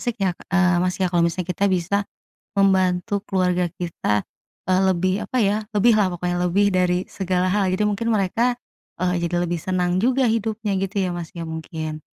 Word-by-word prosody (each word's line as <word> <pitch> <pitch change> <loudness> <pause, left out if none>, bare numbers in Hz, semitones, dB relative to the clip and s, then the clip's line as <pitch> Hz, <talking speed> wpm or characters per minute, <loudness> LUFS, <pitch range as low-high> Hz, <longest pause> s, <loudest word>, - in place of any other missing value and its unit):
asyik 240 -2 -2
ya, - - +3 0.2
eee, 180 -2 +4
Mas, 180 0 0
ya, 185 - +3
kalau 175 -1 +2
misalnya 170 +1 -2
kita 200 - 0
bisa 185 +2 0 0.6
membantu 190 0 +2
keluarga 180 -2 0
kita, 105 - -1 0.4
eee, 185 0 +3
lebih 185 +1 0
apa 255 - -5
ya, 205 0 +2 0.2
lebih 215 +3 +4
lah 190 -4 +2
pokoknya, 175 0 -2
lebih 200 +4 +3
dari 180 -1 +2
segala 185 -1 -1
hal. 195 -1 +1
Jadi 210 +3 +1
mungkin 230 +3 -1
mereka, 230 +5 +1 0.4
eee, 180 0 +1
jadi 175 +1 -1
lebih 170 0 -2
senang 180 -1 0
juga 260 +1 +3
hidupnya 220 -2 -1
gitu 195 +2 -3
ya, 185 -2 0
Mas, 170 -2 -6
ya, 170 -2 -6
mungkin. 160 -1 -5
185 Hz, 185 wpm, -22 LUFS, 175-200 Hz, 0.6 s, eee